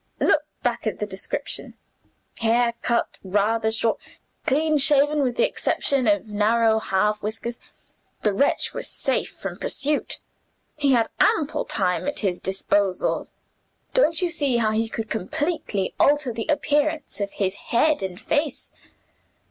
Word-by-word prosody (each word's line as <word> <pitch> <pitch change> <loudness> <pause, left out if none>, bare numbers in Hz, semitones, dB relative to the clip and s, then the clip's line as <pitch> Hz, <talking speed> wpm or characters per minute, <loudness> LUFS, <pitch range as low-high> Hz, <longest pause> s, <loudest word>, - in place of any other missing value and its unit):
"Look 305 - +3 0.2
back 235 -1 -1
at 215 - -2
the 210 - -2
description: 190 -1 -2 0.6
'Hair 235 +1 +2
cut 235 -1 +1 0.2
rather 210 +3 +1
short, 225 0 0 0.5
clean 305 +2 +2
shaven, 290 +1 +4
with 250 -3 0
the - - +3
exception 270 -4 0
of 205 -1 +2
narrow 220 +2 +2
half 210 +1 0
whiskers.' 225 +3 -3 0.6
The 210 - +2
wretch 280 +9 +1
was - - -1
safe - - 0
from - - -7
pursuit; 290 +2 0 0.6
he 285 -2 +2
had 230 -2 +2
ample 305 -1 +2
time 185 +3 -1
at 290 - -1
his 190 -4 -1
disposal 195 0 0 0.7
don't 350 -9 +3
you 355 - +1
see 285 -7 +1
how 220 -2 +2
he 225 +1 0
could 225 0 -4
completely 220 - -2
alter 290 -4 +3
the 225 - -4
appearance 295 -2 0
of 200 0 -3
his 190 -2 0 0.2
head 295 +2 +3
and 185 -1 -5
face? 290 +4 -1
235 Hz, 140 wpm, -23 LUFS, 210-290 Hz, 0.7 s, shaven